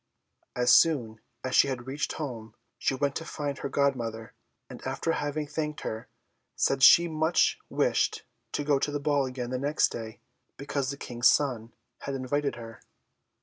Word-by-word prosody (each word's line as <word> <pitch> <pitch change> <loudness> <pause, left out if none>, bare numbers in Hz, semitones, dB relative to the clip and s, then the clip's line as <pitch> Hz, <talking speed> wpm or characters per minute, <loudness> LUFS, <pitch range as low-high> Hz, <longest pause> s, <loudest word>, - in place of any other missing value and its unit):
As 125 0 +4
soon 120 -9 +3 0.2
as 130 - -3
she - - +6
had 125 -3 -4
reached 140 +3 -3
home, 115 -7 -6 0.2
she 135 - 0
went 140 +1 -1
to - - -5
find 145 -3 -4
her - - -4
godmother; 120 -6 -1 0.3
and - - -10
after 165 - -2
having 150 -1 -2
thanked 150 0 -4
her, 110 0 -5 0.5
said 135 -1 +1
she 170 +5 +8
much 160 +1 +2
wished - - +1 0.3
to 145 - -1
go 145 -1 +2
to 150 - 0
the 145 0 -2
ball 145 -2 +1
again 125 -1 -5
the 130 - -2
next 145 +3 +2
day, 110 -1 -7 0.4
because 140 -1 -2
the 140 - -4
King's 120 -2 +2
son 120 -6 0 0.3
had 140 - -4
invited 140 +2 -1
her. 115 -1 -10
140 Hz, 170 wpm, -28 LUFS, 125-145 Hz, 0.5 s, she